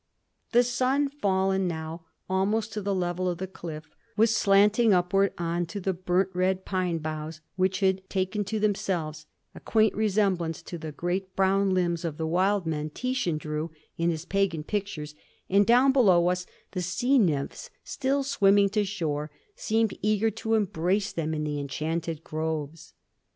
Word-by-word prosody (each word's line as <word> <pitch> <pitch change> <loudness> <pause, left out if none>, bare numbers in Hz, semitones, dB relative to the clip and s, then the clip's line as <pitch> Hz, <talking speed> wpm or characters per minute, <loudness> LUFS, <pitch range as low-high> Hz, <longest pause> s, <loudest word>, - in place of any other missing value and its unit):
The 245 +1 +5
sun, 255 +4 +1
fallen 190 -7 +1
now 165 0 -5 0.2
almost 210 +4 0
to 210 - -3
the 200 0 -1
level 180 0 -1
of 175 - -2
the 190 - -3
cliff, 160 -4 -8 0.3
was 225 +1 +4
slanting 210 +2 +4
upward 195 +3 +2
on 170 0 -1
to 200 +5 -5
the 190 0 -1
burnt 185 +1 0
red 185 +1 0
pine 185 -3 -1
boughs, 155 0 -5 0.2
which 190 +1 0
had 190 0 +1
taken 190 +2 -1
to 215 +2 -2
themselves 170 -7 -1 0.3
a - - -10
quaint 220 -2 +2
resemblance 195 -6 0
to 175 - -7
the 160 -1 -6
great 185 +4 -3
brown 195 +1 +3
limbs 175 -1 0
of 160 -3 -3
the 160 - -2
wild 185 +3 +1
men 155 -1 -2
Titian 250 -4 -1
drew 150 +1 -4 0.3
in 170 +1 +1
his 165 -1 -3
pagan 190 -6 0
pictures, 170 -6 -4 0.4
and 200 +1 +4
down 250 +3 +6
below 185 -10 +4
us 180 0 -2 0.2
the 180 - -3
sea 245 +10 +2
nymphs, 150 -10 -1
still 275 +1 -1
swimming 200 -7 +4
to 210 +1 +1
shore, 155 -7 -2 0.3
seemed 225 -1 0
eager 215 +2 +2
to 225 +1 -1
embrace 195 -1 0
them 160 -1 -2
in 150 - -2
the 150 -1 -2
enchanted 160 +3 -3
groves. 155 0 -4
185 Hz, 165 wpm, -27 LUFS, 165-205 Hz, 0.4 s, down